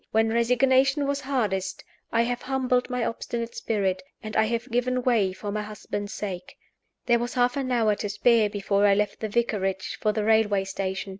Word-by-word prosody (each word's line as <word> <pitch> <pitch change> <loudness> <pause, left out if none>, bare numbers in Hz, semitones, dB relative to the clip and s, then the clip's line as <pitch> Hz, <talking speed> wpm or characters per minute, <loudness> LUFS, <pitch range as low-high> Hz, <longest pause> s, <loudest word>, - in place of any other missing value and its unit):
When 225 0 +2
resignation 260 +4 +3
was 280 0 -1
hardest, 200 -8 -2 0.3
I 230 0 +3
have 245 +1 -2
humbled 255 -2 0
my 250 -2 -1
obstinate 235 0 -4
spirit, 190 -4 -1 0.2
and 215 0 -6
I 220 - +4
have 235 +3 -3
given 250 +1 0
way 225 -7 +2
for 205 +2 -6
my 210 +1 -2
husband's 205 -1 -5
sake." 190 -4 -6 0.5
There 240 -1 +3
was 240 +2 -4
half 245 0 +2
an 270 -2 -2
hour 225 -3 +3
to 205 - -3
spare 215 +1 +3
before 200 0 +1
I 200 - +5
left 210 +1 -1
the 220 - -3
vicarage 200 -4 -1
for 215 - +2
the 215 0 -2
railway 210 -2 +3
station. 195 0 -4
225 Hz, 190 wpm, -26 LUFS, 205-245 Hz, 0.5 s, I